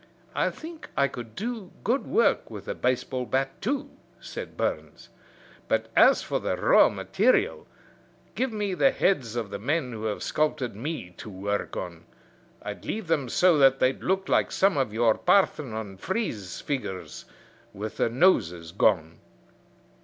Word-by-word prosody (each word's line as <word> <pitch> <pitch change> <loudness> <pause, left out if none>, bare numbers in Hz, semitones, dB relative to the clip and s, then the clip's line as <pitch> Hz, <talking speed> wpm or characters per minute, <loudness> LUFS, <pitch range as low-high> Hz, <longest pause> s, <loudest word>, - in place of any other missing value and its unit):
"I - - +1
think 325 0 -10
I 140 - +4
could 115 -4 -9
do 220 -4 -4
good 245 +6 0
work 455 - +2
with - - -9
a - - -1
baseball 125 0 -1
bat 135 +1 -1
too," 275 +7 -2 0.3
said - - -8
Burns; - - -3 0.6
"but - - 0
as - - +6
for - - -1
the - - -2
raw - - +6
material, 450 -2 +1 0.7
give 260 0 -1
me 205 -3 -2
the 270 - +4
heads 130 - +1
of 115 -4 -3
the 100 - -4
men 135 +3 -1
who 110 -1 -6
have 105 -1 -2
sculped 155 -1 0
me 115 - -5
to - - -8
work 100 +1 -3
on. 85 -2 -6 0.6
I'd 105 0 -6
leave 220 -1 -3
them 155 -6 0
so 180 0 +4
that 135 -1 +6
they'd 130 0 +1
look 190 +1 0
like - - +2
some 195 0 +3
of 135 -6 0
your 115 +1 +3
Parthenon 115 - +1
frieze 115 - -3
figures 130 -10 -4 0.5
with 105 +2 -6
the - - +2
noses 95 - +2
gone." 85 -4 +1
135 Hz, 155 wpm, -27 LUFS, -, 0.7 s, as